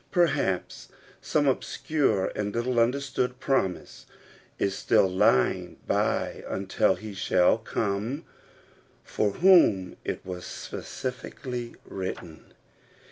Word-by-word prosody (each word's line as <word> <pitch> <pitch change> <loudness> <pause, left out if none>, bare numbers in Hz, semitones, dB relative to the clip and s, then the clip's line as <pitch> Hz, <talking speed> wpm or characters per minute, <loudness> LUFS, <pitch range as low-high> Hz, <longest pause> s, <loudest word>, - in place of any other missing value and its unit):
Perhaps 165 - 0 0.3
some 145 -2 +1
obscure 135 -5 0
and 105 0 -3
little 120 +1 0
understood 125 +1 0
promise 115 -10 -1 0.5
is 100 -1 0
still - - +3
lying 90 -8 +2
by - - 0
until 95 0 +1
he 110 -1 -8
shall 95 +1 +3
come 110 +6 -2 0.8
for 105 - 0
whom 165 - +5
it - - -4
was 90 -1 -6
specially 125 -1 -6
written. 95 -4 -7
110 Hz, 95 wpm, -27 LUFS, 95-130 Hz, 0.8 s, whom